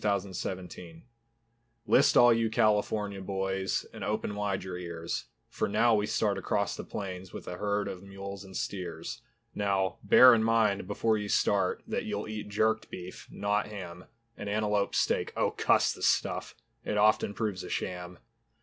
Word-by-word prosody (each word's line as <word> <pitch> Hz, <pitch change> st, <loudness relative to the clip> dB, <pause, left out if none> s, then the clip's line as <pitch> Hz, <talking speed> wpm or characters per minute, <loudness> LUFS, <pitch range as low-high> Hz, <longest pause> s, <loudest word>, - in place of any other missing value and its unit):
CALIFORNIA 95 Hz, -2 st, -2 dB
TRAIL 85 Hz, -2 st, -11 dB, 0.8 s
List 140 Hz, -, +5 dB
all 120 Hz, -1 st, +8 dB
you 115 Hz, -1 st, +1 dB
California 105 Hz, -2 st, +1 dB
boys 95 Hz, 0 st, -2 dB
And -, -, -7 dB
open 105 Hz, 0 st, -2 dB
wide 100 Hz, -2 st, -2 dB
your 95 Hz, -1 st, -5 dB
ears, 85 Hz, -2 st, -4 dB, 0.2 s
For -, -, -2 dB
now 115 Hz, +3 st, +3 dB
we 105 Hz, -1 st, +2 dB
start 105 Hz, -2 st, 0 dB
across 100 Hz, -3 st, -1 dB
the -, -, -6 dB
plains 95 Hz, -2 st, -6 dB
With -, -, -9 dB
a 90 Hz, -, -5 dB
herd 100 Hz, 0 st, -1 dB
of 90 Hz, -2 st, -6 dB
mules 100 Hz, 0 st, -8 dB
and 95 Hz, -1 st, -8 dB
steers. 90 Hz, +2 st, -5 dB, 0.3 s
Now, 95 Hz, -3 st, 0 dB
bear 125 Hz, +5 st, +8 dB
in 110 Hz, -1 st, +3 dB
mind 110 Hz, -4 st, +2 dB
before 110 Hz, +2 st, +1 dB
you 105 Hz, 0 st, -4 dB
start, 95 Hz, -3 st, +1 dB
That -, -, -3 dB
you'll 105 Hz, 0 st, -3 dB
eat 110 Hz, -1 st, -6 dB
jerked 110 Hz, +2 st, +1 dB
beef, 90 Hz, 0 st, -9 dB
not 105 Hz, 0 st, -1 dB
ham, 90 Hz, -4 st, -8 dB, 0.3 s
And 105 Hz, -, -6 dB
antelope 105 Hz, -1 st, 0 dB
steak, -, -, +1 dB
Oh -, -, +2 dB
cuss -, -, +3 dB
the -, -, -12 dB
stuff! -, -, 0 dB, 0.3 s
It 105 Hz, -, -2 dB
often 105 Hz, -1 st, +3 dB
proves 100 Hz, -4 st, -2 dB
a 90 Hz, -, -7 dB
sham. 90 Hz, -1 st, -4 dB
100 Hz, 165 wpm, -29 LUFS, 95-105 Hz, 0.8 s, all